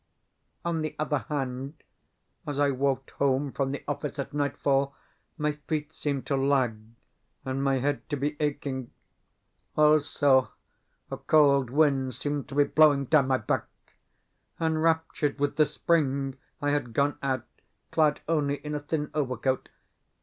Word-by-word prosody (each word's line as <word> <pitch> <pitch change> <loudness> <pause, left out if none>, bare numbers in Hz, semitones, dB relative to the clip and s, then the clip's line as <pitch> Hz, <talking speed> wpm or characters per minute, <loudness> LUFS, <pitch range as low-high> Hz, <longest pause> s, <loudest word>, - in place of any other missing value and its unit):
On 170 -2 0
the 155 -1 -3
other 150 -1 0
hand, 135 0 -3 0.7
as 145 -1 -2
I 145 -1 +3
walked 135 0 -1
home 140 0 +1
from 135 0 -1
the 140 - -5
office 145 0 -3
at 140 - -4
nightfall 140 -1 0 0.4
my 150 0 +1 0.2
feet 155 0 -2
seemed 140 -3 -3
to 140 - 0
lag, 135 -4 +2 0.7
and 130 +1 -2
my 135 -1 +2
head 135 -2 -2
to 145 - -1
be 145 +2 -1
aching. 140 -4 -2 0.9
Also, 145 -3 +4 0.6
a - - -3
cold 140 -4 +4
wind 135 -3 +2
seemed 145 +1 -3
to 135 - -7
be 145 - +6
blowing 145 -2 +4
down 140 -1 +4
my 130 -1 +3
back 110 - -1 0.9
(enraptured 160 -2 +1
with 145 0 0
the 155 -2 +5
spring, 140 -2 0 0.3
I 145 - +2
had 145 -5 -1
gone 145 +3 +1
out 130 -3 -1 0.5
clad 155 -2 +2
only 150 -3 +1
in 150 +1 -6
a 150 - -1
thin 150 0 -3
overcoat). 130 -3 -1
140 Hz, 145 wpm, -27 LUFS, 135-150 Hz, 0.9 s, be